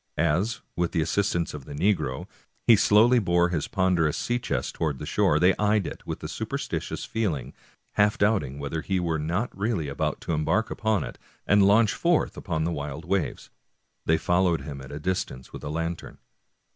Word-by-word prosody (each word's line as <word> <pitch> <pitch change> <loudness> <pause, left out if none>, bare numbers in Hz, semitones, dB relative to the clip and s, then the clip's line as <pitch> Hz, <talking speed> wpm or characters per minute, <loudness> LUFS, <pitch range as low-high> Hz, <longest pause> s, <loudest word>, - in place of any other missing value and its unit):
As, 85 +8 +1
with 85 -1 -1
the 85 - +2
assist 100 +5 0
ance 85 -1 -1
of 70 -3 -8
the 70 - -8
negro, 75 -6 0 0.4
he 115 - +8
slowly 110 +5 +5
bore 85 -3 +2
his 80 -4 -1
ponderous 90 -5 +1
sea 120 0 -1
chest 70 - -2
toward 75 -4 -1
the - - -6
shore, 75 - +2
they 90 +3 +4
eyed 105 -2 +2
it - - -8
with - - -5
a - - -3
superstitious - - -4
feeling, 75 - -2 0.4
half 105 +1 +2
doubting 100 -11 +1
whether 70 +3 -3
he 95 +2 -1
were 85 -3 -1
not 90 +10 -2
really 100 -6 -1
about 70 - -2
to 85 - -2
embark 80 +9 +1
upon 110 -6 0
it - - -8 0.3
and 100 -1 +5
launch 105 +1 +5
forth 170 -2 +1
upon 80 -4 -2
the 85 - 0
wild 75 0 -5
waves. 95 -1 -2 0.6
They 80 - +4
fol 90 +3 +2
lowed 85 -2 +1
him 70 -3 -7
at 65 - -10
a 70 - -5
distance 75 -6 -3
with - - -8
a - - -4
lantern. 80 +2 -4
85 Hz, 195 wpm, -26 LUFS, 75-100 Hz, 0.6 s, he